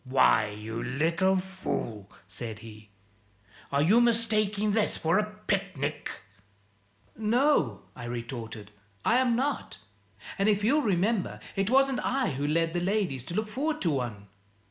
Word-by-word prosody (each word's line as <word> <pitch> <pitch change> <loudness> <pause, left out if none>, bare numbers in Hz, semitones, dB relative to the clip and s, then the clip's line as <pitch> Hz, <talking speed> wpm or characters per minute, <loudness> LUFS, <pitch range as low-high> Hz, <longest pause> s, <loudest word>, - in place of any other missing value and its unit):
"Why, 130 -4 +4
you 110 +2 -6
little 165 +9 +1
fool," 185 - -4 0.2
said 110 +3 -6
he, 110 -1 -12 0.8
"are 140 +1 +3
you 215 +9 +5
mistaking 215 -3 +2
this 215 0 +1
for 165 +5 +2
a 210 0 -2
picnic?" 185 -8 -1 1.1
"No," 220 - +2
I 120 - -8
retorted; 115 -3 -6 0.3
"I 235 - +4
am 250 -2 +3
not. 275 +4 -2 0.6
And, 200 +2 +3
if 205 -1 +2
you'll 285 +8 +4
remember, 200 -2 0 0.2
it 195 +1 0
wasn't 270 0 +3
I 265 -7 +1
who 140 +2 -2
led 165 +2 +1
the 175 - 0
ladies 180 - 0
to 170 - -6
look 215 +1 0
forward 300 +8 -2
to 170 - +2
one." 120 -7 -3
185 Hz, 145 wpm, -28 LUFS, -, 1.1 s, you